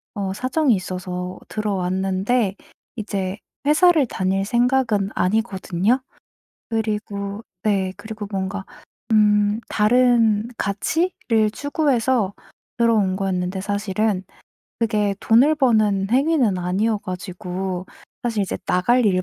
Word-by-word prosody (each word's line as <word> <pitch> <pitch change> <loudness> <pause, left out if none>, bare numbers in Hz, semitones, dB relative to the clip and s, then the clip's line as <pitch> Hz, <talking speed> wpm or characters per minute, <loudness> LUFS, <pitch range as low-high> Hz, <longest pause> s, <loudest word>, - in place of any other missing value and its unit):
어 195 -2 -2
사정이 255 +4 +1
있어서 180 -1 -5
들어왔는데 195 +1 0 0.4
이제 200 -3 -3 0.3
회사를 310 0 +5
다닐 195 -1 -1
생각은 240 -4 +2
아니거든요. 200 +2 +1 0.7
그리고 210 -2 -3 0.2
네 195 -3 +1
그리고 215 0 -7
뭔가 195 0 -3 0.5
음 210 0 +3
다른 225 -1 +3
가치를 225 - 0
추구해서 260 -8 0 0.4
들어온 220 -5 +2
거였는데 190 -1 -2
사실은 205 -1 -1 0.5
그게 210 -3 +1
돈을 255 +7 +5
버는 215 -8 +2
행위는 260 - +2
아니어 200 +5 0
가지고 185 0 -5 0.4
사실 230 -4 0
이제 195 - -3
나갈 235 +6 +3
일 185 -2 +2
210 Hz, 245 characters per minute, -22 LUFS, 190-230 Hz, 0.7 s, 회사를